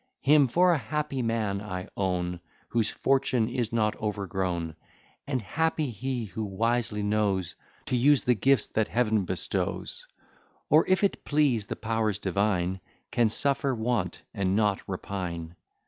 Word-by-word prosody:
Him 145 -1 +5
for 175 +8 +4
a 160 - +1
happy 140 +3 -2
man 110 -4 -1
I 90 -3 -5
own, 90 -2 -1 0.3
Whose 115 -2 +1
fortune 130 -4 +1
is 120 -2 -2
not 110 -2 +1
overgrown; 95 -6 -2 0.5
And 130 -5 -1
happy 160 +3 0
he 125 +1 -3
who 105 +2 -5
wisely 110 +1 -1
knows 100 -4 0 0.3
To 130 - -1
use 140 +3 +4
the 125 - +4
gifts 130 +3 +2
that 110 -1 0
Heaven 110 -4 +1
bestows; 90 -4 -2 0.6
Or, 155 +3 +6
if 185 +2 +2
it 200 - +1
please 140 -8 +2
the - - -3
powers 110 -2 -1
divine, 95 -2 0 0.3
Can 120 -2 +3
suffer 140 +2 +2
want 110 -4 -1
and 95 -3 0
not 105 -2 +2
repine. 90 -3 -4
110 Hz, 145 wpm, -28 LUFS, 95-130 Hz, 0.6 s, Or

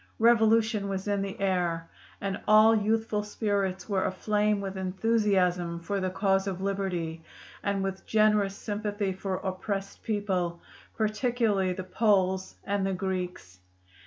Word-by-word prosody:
Revolution 220 -2 +4
was 195 +1 -3
in 200 -1 +1
the 200 +2 -5
air, 175 -4 0 0.3
and 195 0 -3
all 215 +1 +7
youthful 220 0 +1
spirits 200 -3 -2
were 195 -3 +1
aflame 210 +2 +1
with 195 -1 -4
enthusiasm 185 -3 +1
for 195 +4 -2
the 185 -1 -1
cause 195 +1 +1
of 190 -2 -3
liberty 185 -5 -2 0.4
and 200 -1 -1
with 190 0 -4
generous 210 -2 +3
sympathy 205 -1 -2
for 190 0 -3
oppressed 195 +1 -4
people, 190 -5 -1 0.4
particularly 215 -3 +1
the 185 - -5
Poles 190 -2 +1
and 200 -1 -1
the 195 0 0
Greeks. 180 - -4
195 Hz, 130 wpm, -28 LUFS, 185-210 Hz, 0.4 s, all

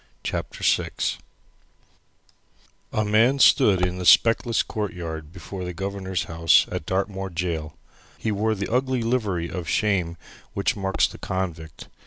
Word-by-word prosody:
CHAPTER - - -4
VI - - +2 2.0
A 110 - 0
Man 115 +6 +4
stood 100 -9 +5
in 90 0 -3
the 90 - -4
speckless 115 0 +5
courtyard 85 -7 -5
before 90 +2 -7
the 90 -1 -5
Governor's 95 -1 -3
house 85 -1 +4
at 75 - -4
Dartmoor 95 0 -2
gaol. 85 -3 -3 0.4
He 110 - -2
wore 110 +2 0
the 100 +2 -4
ugly 130 -1 +1
livery 105 -8 0
of 90 -2 -5
shame 90 -5 0 0.4
which 100 - 0
marks 95 -2 +1
the - - -12
convict. 85 -4 -5
95 Hz, 135 wpm, -24 LUFS, 85-105 Hz, 2.0 s, stood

